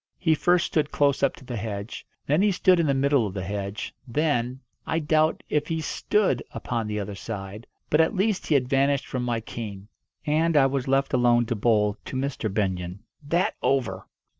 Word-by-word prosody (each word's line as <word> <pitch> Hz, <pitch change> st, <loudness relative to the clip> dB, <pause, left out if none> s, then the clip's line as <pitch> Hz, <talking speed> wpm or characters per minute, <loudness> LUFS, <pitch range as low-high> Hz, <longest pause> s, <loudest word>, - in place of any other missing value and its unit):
He 160 Hz, -4 st, +2 dB
first 175 Hz, +3 st, +3 dB
stood 150 Hz, -2 st, 0 dB
close 140 Hz, -1 st, +2 dB
up 140 Hz, -, +2 dB
to -, -, -15 dB
the 120 Hz, -1 st, -4 dB
hedge, 105 Hz, 0 st, -5 dB, 0.2 s
then 150 Hz, +6 st, +2 dB
he 205 Hz, 0 st, +4 dB
stood 185 Hz, -1 st, +4 dB
in 165 Hz, -, +2 dB
the 140 Hz, -, +3 dB
middle 135 Hz, -4 st, +2 dB
of 95 Hz, -, -8 dB
the 95 Hz, -, -3 dB
hedge, 100 Hz, +2 st, -4 dB
then 130 Hz, -2 st, 0 dB, 0.3 s
I 160 Hz, -, 0 dB
doubt 155 Hz, 0 st, +2 dB
if 150 Hz, -1 st, 0 dB
he 165 Hz, -1 st, -1 dB
stood 160 Hz, -, +1 dB
upon 115 Hz, -3 st, -3 dB
the 105 Hz, 0 st, -2 dB
other 100 Hz, 0 st, -4 dB
side. 100 Hz, +1 st, -7 dB, 0.2 s
But 150 Hz, -, +4 dB
at 160 Hz, +7 st, +1 dB
least 195 Hz, +1 st, 0 dB
he 155 Hz, -, +3 dB
had 130 Hz, -3 st, +2 dB
vanished 140 Hz, +1 st, +2 dB
from 125 Hz, -, -3 dB
my 120 Hz, -2 st, -1 dB
ken. 105 Hz, -3 st, -7 dB, 0.4 s
And 160 Hz, +2 st, +2 dB
I 135 Hz, -, +6 dB
was 135 Hz, -1 st, -1 dB
left 135 Hz, +1 st, +1 dB
alone 120 Hz, -1 st, +4 dB
to 120 Hz, +1 st, -2 dB
bowl 105 Hz, -1 st, +2 dB
to -, -, -6 dB
Mr. 130 Hz, -5 st, -2 dB
Benyon. 95 Hz, -2 st, -2 dB, 0.2 s
That 170 Hz, +5 st, 0 dB
over! 110 Hz, -9 st, 0 dB
130 Hz, 200 wpm, -25 LUFS, 105-150 Hz, 0.4 s, I